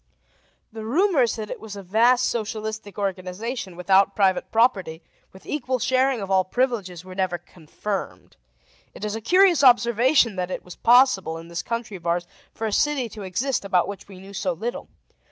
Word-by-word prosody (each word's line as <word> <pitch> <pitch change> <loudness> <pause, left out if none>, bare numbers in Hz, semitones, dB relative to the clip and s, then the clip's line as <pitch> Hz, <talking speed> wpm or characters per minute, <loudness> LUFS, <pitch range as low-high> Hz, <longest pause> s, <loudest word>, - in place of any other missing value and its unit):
The 220 -1 -7
rumors 275 - +2
that 215 -2 -6
it - - -6
was 215 -2 -9
a 200 - -8
vast 235 +6 +3
socialistic 215 -2 -4
organization, 195 +2 -4
without 190 +2 +3
private 190 -2 +1
property, 190 -8 +1 0.3
with 190 - -16
equal 260 -3 -2
sharing 260 0 +1
of 195 0 -5
all 190 -1 +4
privileges, 190 -6 -2
were 185 - -9
never 185 -2 -1
confirmed. 175 +4 -7 0.6
It 215 - -6
is 210 0 -3
a 225 - -5
curious 360 - +4
observation 240 -2 +4
that 180 0 -2
it - - -5
was 180 - -10
possible, 235 -9 +4
in 165 +1 -11
this 170 0 -3
country 230 -4 -4
of 170 - -9
ours, 175 +1 0 0.3
for 225 - -5
a 215 - -2
city 285 -4 +1
to 215 - -10
exist 230 +8 -2
about 185 -3 +1
which 200 -1 -8
we 195 -2 -12
knew 195 +1 -12
so 190 -2 -1
little. 230 +9 -5
210 Hz, 180 wpm, -24 LUFS, 185-240 Hz, 0.6 s, all